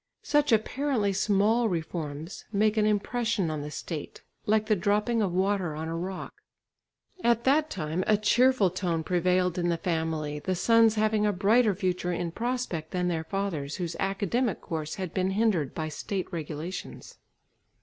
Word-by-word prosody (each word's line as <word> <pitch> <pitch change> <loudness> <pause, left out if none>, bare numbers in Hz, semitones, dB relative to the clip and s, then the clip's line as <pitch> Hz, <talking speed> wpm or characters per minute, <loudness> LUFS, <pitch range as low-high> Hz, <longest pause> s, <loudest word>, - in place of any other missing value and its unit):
Such 295 -2 +2
apparently 225 -1 +1
small 210 +4 +2
reforms 160 -1 -4
make 215 +1 +2
an 215 -1 +3
impression 215 -3 0
on 155 -1 -3
the 150 - -5
state, 150 0 -6 0.2
like 215 0 +3
the 215 -1 +3
dropping 210 +4 +1
of 195 -4 +1
water 185 -3 0
on 160 +1 -4
a 165 - -3
rock. 185 +3 -5 0.9
At 235 0 +3
that 300 +3 +3
time 165 - -2
a 215 - +4
cheerful 230 -1 +3
tone 175 -3 -1
prevailed 180 +1 +1
in 175 0 +1
the 170 - +1
family, 160 -4 -2
the 185 +5 -2
sons 225 +3 +4
having 215 -1 +2
a - - +3
brighter 210 +2 +3
future 180 -2 -1
in 175 -1 -2
prospect 230 -8 -3
than 180 -1 -1
their 160 -2 -2
fathers, 160 -6 -3
whose 170 -2 -4
academic 200 +4 0
course 155 -2 -4
had 185 -4 -5
been 185 0 +1
hindered 195 - +1
by 160 -2 -2
State 185 +4 -4
regulations. 160 +2 -6
190 Hz, 160 wpm, -28 LUFS, 165-215 Hz, 0.9 s, a